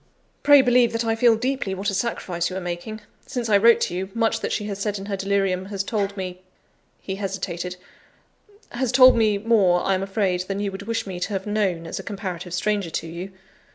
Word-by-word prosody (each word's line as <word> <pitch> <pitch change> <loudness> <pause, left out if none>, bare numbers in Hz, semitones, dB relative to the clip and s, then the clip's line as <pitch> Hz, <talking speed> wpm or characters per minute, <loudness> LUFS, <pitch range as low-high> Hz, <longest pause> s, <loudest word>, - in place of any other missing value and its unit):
"Pray 285 -2 +7
believe 245 -2 +4
that 230 0 -1
I 225 - +2
feel 230 0 +5
deeply 245 -4 -2
what 200 +2 -2
a - - -6
sacrifice 180 -5 -2
you 185 - -6
are - - -2
making. 175 +5 -5 0.3
Since 245 -4 -3
I 205 - +6
wrote 230 +2 +6
to - - -1
you, 190 +2 -3
much 225 -1 +1
that - - -3
she - - -1
has 200 -1 -5
said 205 0 -2
in 195 - -7
her 200 -1 -2
delirium 195 -1 0
has 200 0 -3
told 200 -1 -2
me" 185 -1 -5 0.6
(he 190 0 -5
hesitated) 185 -2 -4 1.0
"has 240 0 -1
told 255 0 +8
me 215 -3 +3
more, 200 -5 +3
I 195 - +2
am 185 - 0
afraid, 195 -2 0
than 195 0 -3
you 205 -1 -2
would 195 +2 -8
wish 230 0 -1
me 185 -3 -6
to 180 - -2
have 190 -1 -3
known, 200 -5 -1
as 165 - -5
a - - -7
comparative 180 -3 -5
stranger 205 -1 0
to 165 - -3
you. 170 +4 -7
200 Hz, 225 wpm, -23 LUFS, 185-225 Hz, 1.0 s, told